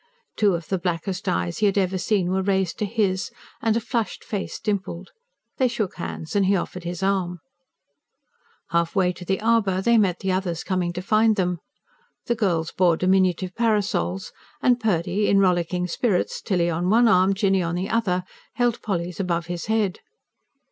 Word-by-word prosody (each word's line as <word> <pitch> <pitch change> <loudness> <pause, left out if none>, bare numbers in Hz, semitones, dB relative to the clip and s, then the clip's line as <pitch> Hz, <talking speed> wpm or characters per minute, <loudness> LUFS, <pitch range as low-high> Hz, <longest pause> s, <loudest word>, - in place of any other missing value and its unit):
Two 205 -4 +3
of 165 -1 -6
the 190 - -1
blackest 185 +2 -2
eyes 175 -1 -1
he 210 - +4
had 200 - 0
ever 190 -1 +1
seen 185 -1 +1
were 190 +1 +1
raised 190 -2 0
to 210 - 0
his, 200 -3 0 0.3
and 225 0 +2
a - - +2
flushed 230 -1 -3
face 205 -3 -4
dimpled. 190 -3 -3 0.5
They 260 - +3
shook 215 -5 -3
hands, 165 0 -6
and 200 -2 +3
he 200 - +4
offered 180 -1 -4
his 175 +1 -4
arm. 190 -2 0 1.3
Halfway 175 +2 +1
to 180 - -10
the 190 +2 -1
arbour, 220 -4 +2
they 235 +4 +4
met 185 -4 +1
the 190 - 0
others 185 -3 -2
coming 185 -2 -1
to 180 +1 -5
find 215 +2 +3
them. 180 -3 0 0.7
The 235 - +1
girls 175 -8 0
bore 175 -3 +3
diminutive 185 -1 +2
parasols; 205 -4 0 0.3
and 250 -3 +3
Purdy, 205 -1 0
in 200 - +4
rollicking 180 -2 +2
spirits, 185 +1 0
Tilly 175 -3 +1
on 175 +2 -1
one 230 +3 +5
arm, 190 -2 +4
Jinny 195 -1 +2
on 170 0 -2
the 185 +3 -3
other, 190 -6 +1 0.3
held 245 -1 +1
Polly's 180 -4 -3
above 170 -3 -1
his 175 +1 -5
head. 215 -4 0
190 Hz, 175 wpm, -24 LUFS, 180-210 Hz, 1.3 s, one